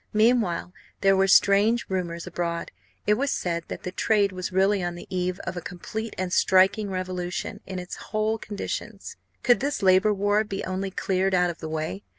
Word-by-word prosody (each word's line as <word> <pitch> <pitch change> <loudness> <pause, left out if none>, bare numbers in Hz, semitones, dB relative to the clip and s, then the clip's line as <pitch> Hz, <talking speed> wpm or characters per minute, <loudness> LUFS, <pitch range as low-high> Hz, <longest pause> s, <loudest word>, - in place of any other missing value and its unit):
Meanwhile 215 -5 +2 0.3
there 195 -1 +5
were 195 0 +3
strange 205 +4 +4
rumours 170 -3 -3
abroad. 170 -1 -3 0.3
It 210 - +4
was 275 +6 0
said 170 - -2
that - - -7
the 180 - -4
trade 205 0 +2
was 185 0 -5
really 195 +1 +3
on 175 0 -3
the 175 - -9
eve 180 0 -1
of - - -5
a 175 - -4
complete 220 +5 -6
and 185 -1 -2
striking 190 +3 +4
revolution 185 -1 -4
in 190 - -5
its 180 0 -6
whole 215 +1 -1
conditions 205 -2 -6 0.3
could 245 -4 +5
this 280 -4 -2
labour 190 +3 +5
war 205 +2 +2
be 195 -2 -5
only 190 +1 -2
cleared 190 0 0
out 180 -1 +3
of 170 - -13
the 160 - -6
way. 155 -11 -3
190 Hz, 185 wpm, -25 LUFS, 180-210 Hz, 0.3 s, there